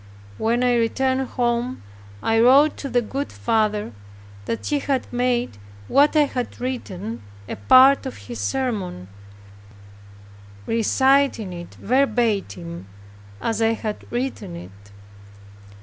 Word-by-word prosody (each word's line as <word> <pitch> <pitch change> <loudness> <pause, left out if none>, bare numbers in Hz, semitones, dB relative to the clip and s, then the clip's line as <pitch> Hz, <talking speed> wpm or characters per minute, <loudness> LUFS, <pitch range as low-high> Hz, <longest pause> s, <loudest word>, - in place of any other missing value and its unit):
When 235 +2 +1
I 250 -1 +3
returned 260 +3 0
home, 240 +1 -1 0.4
I 225 0 +2
wrote 275 +6 +6
to 275 - -5
the 245 -1 +1
good 275 +6 -4
father 215 - 0 0.5
that 230 - -4
he 290 - 0
had 270 -2 -1
made 245 - 0 0.3
what 290 +3 +4
I 305 - +6
had 255 -4 -4
written 230 -4 -5 0.3
a - - -4
part 260 - +6
of 260 - -7
his 240 - -7
sermon, 205 - -3 1.6
reciting 260 -2 +2
it 175 0 -9
verbatim 205 - -1 0.5
as 225 -1 -2
I 225 0 +3
had 215 -2 -5
written 240 - -3
it. 100 +4 -12
240 Hz, 120 wpm, -22 LUFS, 210-260 Hz, 1.6 s, wrote